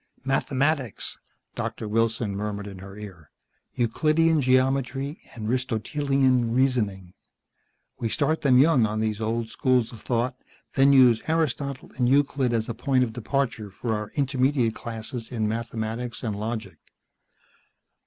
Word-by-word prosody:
"Mathematics," 135 -1 0 0.3
Doctor 110 - -4
Wilson 115 -1 0
murmured 105 0 -3
in 100 -2 -8
her 95 +1 -10
ear. 95 -8 -10 0.5
"Euclidean 155 +6 +2
Geometry 135 +2 +1
and 110 -3 -5
Aristotelean 130 0 +1
reasoning. 105 -9 0 0.9
We 115 - -1
start 155 +5 0
them 130 -3 +4
young 135 -5 +5
on 110 +1 -2
these 110 0 -1
old 115 +1 -1
schools 125 -2 +1
of 110 - -11
thought, 125 +2 -1 0.4
then 135 +1 +5
use 125 -4 +6
Aristotle 145 -4 -1
and 125 -1 +2
Euclid 140 -2 +2
as 115 -2 0
a 120 - -3
point 130 +2 +1
of 115 -3 -3
departure 120 -3 -2
for 110 +4 -3
our 105 0 -3
intermediate 130 -4 +1
classes 115 +1 -5
in 110 -3 -1
mathematics 115 +1 -4
and 110 -4 -2
logic." 110 +2 -5
120 Hz, 135 wpm, -25 LUFS, 110-135 Hz, 0.9 s, use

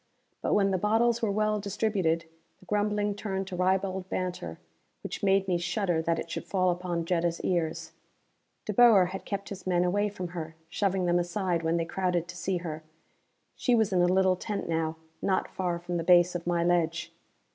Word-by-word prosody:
But - - +1
when 195 -1 +3
the 185 - +1
bottles 225 +4 +2
were 225 - +1
well 215 +1 +1
distributed 195 -5 0 0.3
the - - -19
grumbling 210 +1 0
turned 195 -2 -3
to 185 - -5
ribald 190 +1 0
banter 175 - -3 0.5
which - - -5
made 195 -1 +3
me 180 -2 +1
shudder 175 -2 0
that 165 0 0
it - - -4
should - - -4
fall 185 -2 +2
upon 175 -1 -2
Jetta's 170 -1 0
ears. 165 -3 -1 0.7
De 210 - -2
Boer 205 -5 +6
had 195 - -6
kept 200 -1 -4
his 190 -2 -8
men 175 -1 +2
away 205 +4 +1
from 185 -3 -6
her, 165 -2 -6
shoving 190 0 0
them 175 0 +3
aside 175 -1 -1
when 165 +1 +1
they 165 - 0
crowded 180 -1 -1
to 180 - -7
see 185 +1 -1
her. 160 -3 -5 0.7
She 245 - +2
was 220 -3 +2
in 180 - +3
a 175 - +4
little 185 0 +3
tent 205 +2 -4
now, 160 -1 -1 0.3
not 190 -1 +1
far 180 -2 -1
from 175 0 -4
the 165 - -2
base 175 0 +5
of 175 -1 -5
my 170 -1 +1
ledge. 170 -2 0
185 Hz, 195 wpm, -28 LUFS, 170-200 Hz, 0.7 s, Boer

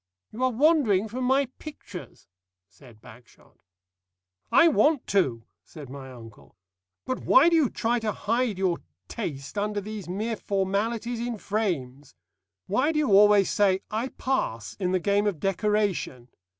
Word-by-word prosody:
"You 240 +4 -4
are 255 - +4
wandering 250 - +3
from 250 +4 -4
my 270 +2 +3
pictures," 230 - -10 0.4
said 115 -2 -19
Bagshot. 120 +3 -18 0.9
"I 335 - +6
want 300 -2 +3
to," 130 - +1 0.2
said 145 -5 -12
my 135 -1 -9
uncle. 115 -4 -14 0.5
"But 255 -1 -2
why 285 +6 +6
do 340 - +2
you 305 -7 +3
try 235 +2 -1
and 225 - -5
hide 220 +1 -1
your 185 -3 0 0.3
taste 140 - -5
under 210 0 -1
these 205 -2 -7
mere 215 +4 -3
formalities 210 +5 -2
in 240 -1 -3
frames? 150 - -3 0.5
Why 260 +10 +1
do 315 - -3
you 300 -7 +1
always 205 0 +6
say 195 -2 +2
'I 225 +4 -1
pass' 115 - -2
in 180 -2 -1
the 185 - +1
game 200 +3 +1
of 190 -7 -2
decoration? 195 - -1
205 Hz, 150 wpm, -26 LUFS, 180-240 Hz, 0.9 s, I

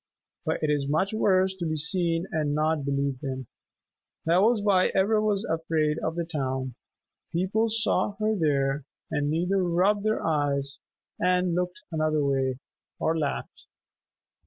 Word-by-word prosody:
But - - -1
it 150 - +2
is 140 -1 0
much 190 +8 +1
worse 190 -3 +2
to 175 - -3
be 155 - -1
seen 165 +1 +2
and 150 -2 0
not 155 -1 +1
believed 140 -1 -1
in. 130 -1 -4 0.8
That 170 +3 +4
was 220 0 +3
why 195 -3 +3
Ivra 210 +3 +3
was 210 0 0
afraid 160 -2 0
of 160 - -2
the 170 -1 -2
town. 130 -5 -3 0.6
People 195 +6 +1
saw 215 -3 +1
her 215 +1 +1
there 140 -5 +1 0.3
and 145 0 0
either 180 +4 +1
rubbed 185 +4 +2
their 215 0 0
eyes 145 -3 0 0.4
and 180 0 +2
looked 180 +1 -2
another 155 -2 +1
way, 135 -2 0 0.4
or 160 - +1
laughed. 150 -3 -4
165 Hz, 150 wpm, -27 LUFS, 145-190 Hz, 0.8 s, That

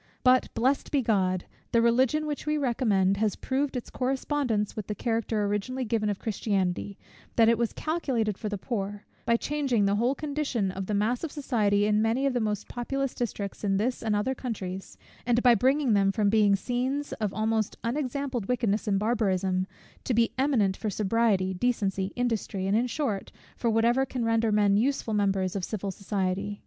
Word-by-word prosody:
But, 255 0 +4
blessed 265 +4 +1
be 280 -3 +1
God, 185 -5 +1 0.3
the 230 - +4
Religion 255 +6 +3
which 300 0 -4
we 300 0 +1
recommend, 215 -8 +2
has 210 -1 +1
proved 270 0 -1
its 245 - -7
correspondence 255 -4 -1
with 215 -2 -5
the 210 - -3
character 225 -1 -1
originally 210 +6 -2
given 215 -2 0
of 205 - -1
Christianity, 200 -3 -1 0.4
that 225 -1 +5
it 230 - +5
was 235 -2 +1
calculated 260 - -1
for 215 +1 -4
the 205 - -3
poor; 205 -1 -4 0.2
by 235 - +4
changing 270 -7 0
the 200 +1 +2
whole 245 +5 +1
condition 280 -10 -1
of 190 0 -5
the 210 - 0
mass 225 +6 0
of 325 - -3
society 210 -8 +1
in 210 0 +2
many 230 +5 +1
of 275 - +1
the 245 - +1
most 210 -2 -2
populous 270 +2 -2
districts 205 -5 -4
in 195 -1 +2
this 245 +5 -1
and 220 -2 0
other 210 +6 0
countries; 195 -7 -6 0.3
and 240 0 +1
by 245 -1 +7
bringing 260 +2 +2
them 195 -1 +3
from 200 0 +1
being 210 -2 +4
scenes 255 +7 -2
of 210 -3 0
almost 220 0 -1
unexampled 255 -2 -2
wickedness 225 -4 0
and 200 -2 +2
barbarism, 190 -4 0 0.4
to 245 - 0
be 230 0 +2
eminent 255 -8 +2
for 215 - -3
sobriety, 205 -2 +1
decency, 195 -2 0
industry, 225 -6 -1
and, 195 +2 +1
in 240 +3 +2
short, 245 -7 -2 0.2
for 235 - 0
whatever 235 +4 +3
can 245 -2 -2
render 225 -1 +2
men 205 -1 +3
useful 240 -1 0
members 195 -2 +1
of 195 - -2
civil 200 0 -3
society. 195 +1 -2
225 Hz, 185 wpm, -27 LUFS, 200-250 Hz, 0.4 s, by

